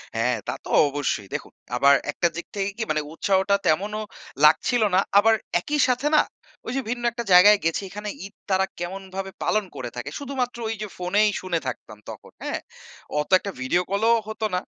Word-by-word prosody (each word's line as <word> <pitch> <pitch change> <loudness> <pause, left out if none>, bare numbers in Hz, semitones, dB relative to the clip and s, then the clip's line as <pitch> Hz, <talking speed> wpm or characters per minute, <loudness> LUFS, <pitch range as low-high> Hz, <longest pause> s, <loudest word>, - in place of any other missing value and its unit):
হ্যা, 115 - +1 0.2
তা - - 0
তো - - -10 0.2
অবশ্যই। 135 -8 -2
দেখুন, - - -5 0.2
আবার 140 +3 +6 0.2
একটা 170 - +1
দিক 175 - -5
থেকে 195 -1 -1
কি? 230 - -1
মানে, 155 0 +1
উৎসাহটা 195 +3 +2
তেমনও 205 +7 +1 0.4
লাগছিল 160 +10 +4
না। - - +6 0.2
আবার 225 +2 +5 0.2
একই 295 +11 -2
সাথে 255 +3 +1
না? - - +7 0.4
ওই - - -4
যে 270 - 0
ভিন্ন 240 0 -3
একটা 235 +1 -4
জায়গায় 205 +4 +8
গেছি, 165 +3 +1
এখানে 210 +2 -6 0.2
ঈদ 200 - -11 0.2
তারা 190 0 +3
কেমনভাবে 190 +2 -5
পালন 215 -1 +1
করে 125 -2 -5
থাকে? 125 +3 -5
শুধুমাত্র 260 -4 -3 0.2
যে 215 - -3
ফোনেই 200 +4 +2
শুনে 180 -3 -1
থাকতাম 110 -4 -6
তখন, - - -10
হ্যা? - - -2 0.6
অত 150 - -2
একটা 200 - -5
ভিডিও 170 +8 +2
কল 200 +2 0
ও - - 0
হতো 220 0 -3
না। - - +1
195 Hz, 185 wpm, -24 LUFS, 165-215 Hz, 0.6 s, জায়গায়